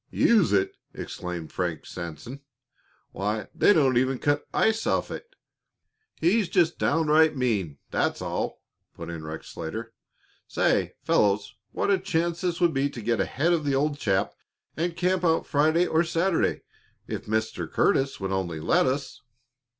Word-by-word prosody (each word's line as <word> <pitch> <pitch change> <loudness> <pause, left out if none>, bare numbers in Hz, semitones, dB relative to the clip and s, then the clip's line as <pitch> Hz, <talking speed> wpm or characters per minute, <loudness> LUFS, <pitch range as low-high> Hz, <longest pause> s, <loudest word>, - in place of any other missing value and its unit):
"Use 220 -7 +3
it!" 95 -1 +1 0.2
exclaimed 90 -3 -6
Frank 85 -3 -3
Sanson. 85 - -7 0.7
"Why, 105 +1 -3
they - - +4
don't 135 -9 +4
even 130 +1 0
cut 145 +3 0
ice 220 0 +1
off - - 0
it." 475 +1 -8 0.8
"He's 190 +4 +2
just 170 -3 +2
downright 155 0 +3
mean, 100 - -1
that's - - 0
all!" - - -3 0.3
put 85 0 -7
in 80 -2 -7
Rex 80 +1 -7
Slater. 110 +8 -6 0.5
"Say, - - +1
fellows, 100 0 +2 0.2
what - - 0
a 195 - +3
chance 170 -2 -1
this 175 -2 -1
would 175 -2 +3
be 135 +1 +1
to 135 - -8
get 115 +1 0
ahead 165 +6 +1
of 165 -3 0
the 140 -2 +1
old 145 +1 0
chap 95 -6 0 0.4
and 170 +1 -2
camp 180 +1 +1
out 165 -2 +2
Friday 155 +4 +3
or 160 0 +2
Saturday 170 +1 0 0.4
if - - -5
Mr. 110 +1 -2
Curtis 135 0 +2
would 95 -1 -3
only 90 -4 -2
let 80 - +2
us." 135 +1 -3
140 Hz, 155 wpm, -26 LUFS, 100-170 Hz, 0.8 s, they